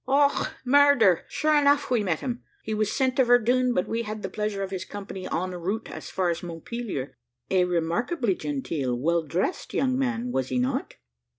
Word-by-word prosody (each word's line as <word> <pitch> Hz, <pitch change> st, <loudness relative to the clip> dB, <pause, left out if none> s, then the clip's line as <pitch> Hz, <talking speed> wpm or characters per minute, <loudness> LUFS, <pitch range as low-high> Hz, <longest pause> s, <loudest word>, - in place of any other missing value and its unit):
"Och, 280 Hz, +1 st, +3 dB, 0.2 s
murder! 255 Hz, -9 st, +5 dB
sure 310 Hz, 0 st, +1 dB
enough 285 Hz, -1 st, +3 dB
we 235 Hz, -4 st, +3 dB
met 175 Hz, -5 st, -1 dB
him. 245 Hz, -2 st, -3 dB, 0.2 s
He 220 Hz, -, -3 dB
was 215 Hz, -1 st, 0 dB
sent 260 Hz, -2 st, +1 dB
to 265 Hz, -, +6 dB
Verdun, 245 Hz, +1 st, +3 dB
but 180 Hz, -, +1 dB
we 230 Hz, +1 st, -1 dB
had 215 Hz, -1 st, -6 dB
the -, -, -4 dB
pleasure 210 Hz, -2 st, -2 dB
of 190 Hz, -, -5 dB
his 190 Hz, -2 st, -3 dB
company 195 Hz, -2 st, -7 dB
en 185 Hz, +2 st, -1 dB
route 185 Hz, +5 st, -3 dB
as -, -, -8 dB
far 185 Hz, -2 st, 0 dB
as 170 Hz, -, -4 dB
Montpelier. 175 Hz, -, -5 dB, 0.4 s
A 185 Hz, -1 st, +4 dB
remarkably 185 Hz, -, 0 dB
genteel, 140 Hz, -4 st, -2 dB
well 170 Hz, +6 st, +1 dB
dressed 170 Hz, -, -2 dB
young 260 Hz, -1 st, +1 dB
man, 250 Hz, -2 st, -1 dB
was 130 Hz, -, -1 dB
he 130 Hz, -, -1 dB
not?" 125 Hz, +1 st, -1 dB
210 Hz, 190 wpm, -26 LUFS, 175-250 Hz, 0.4 s, to